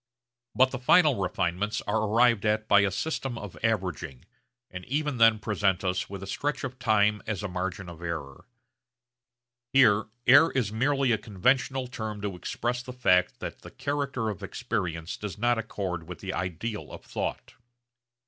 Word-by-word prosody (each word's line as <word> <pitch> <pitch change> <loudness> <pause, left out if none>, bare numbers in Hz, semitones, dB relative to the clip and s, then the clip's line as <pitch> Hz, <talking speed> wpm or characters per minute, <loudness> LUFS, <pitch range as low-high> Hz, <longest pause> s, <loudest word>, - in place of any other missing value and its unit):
But 130 +1 +5
the 125 - -4
final 150 +2 +5
refinements 95 +2 -1
are 110 +2 0
arrived 115 0 +4
at 110 0 +1
by 100 - +6
a 100 -1 +3
system 135 - -3
of 105 -5 -8
averaging, 90 - -2 0.5
and 90 0 -7
even 150 0 -1
then 115 -1 +6
present 100 -3 0
us 95 0 -1
with 100 -1 -7
a - - -5
stretch 145 +11 -2
of 130 -1 -5
time 105 -3 +3
as 105 -2 -3
a - - -1
margin 90 0 -4
of 85 -1 -10
error. 80 -5 -6 1.3
Here 110 -6 +5 0.2
error 145 +6 +7
is 120 -6 0
merely 135 +2 +2
a 110 - +2
conventional 125 +5 +1
term 110 -4 -5
to 100 -2 -3
express 120 +7 -3
the 125 0 -8
fact 90 -8 +2
that - - -6
the - - -11
character 140 -5 -2
of 105 -1 -6
experience 95 -6 -3
does 105 -2 -6
not 120 +1 +2
accord 90 -7 -4
with 90 - -6
the 95 -1 -5
ideal 95 +5 -4
of - - -10
thought. - - -4
105 Hz, 165 wpm, -27 LUFS, 95-125 Hz, 1.3 s, error